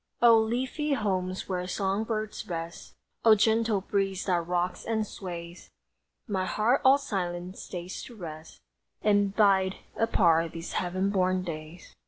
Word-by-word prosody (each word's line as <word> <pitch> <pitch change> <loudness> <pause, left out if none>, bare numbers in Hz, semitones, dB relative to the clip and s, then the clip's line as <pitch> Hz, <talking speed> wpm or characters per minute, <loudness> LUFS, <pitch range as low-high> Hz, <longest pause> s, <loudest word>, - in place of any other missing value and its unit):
O 235 -1 +7
leafy 255 +7 0
homes 190 -6 -1
where 180 -1 -2
song 195 +3 -1
birds 215 -2 -4
rest; 170 -1 -6 0.3
O 225 -1 +8
gentle 220 -1 +2
breeze 195 -1 -1
that 175 -3 0
rocks 180 0 -1
and 220 -1 -1
sways! 175 -3 -8 0.6
My 190 -3 -1
heart 230 +8 +2
all 265 +1 +7
silent 185 -8 -4
stays 180 0 -6
to 240 - -12
rest 160 -5 -9 0.4
And 205 -1 +3
bide 195 -3 +4 0.2
apart 170 -7 +3
these 165 +1 -6
heaven 185 +2 0
born 185 -1 +1
days! 160 0 -8
190 Hz, 140 wpm, -28 LUFS, 175-215 Hz, 0.6 s, O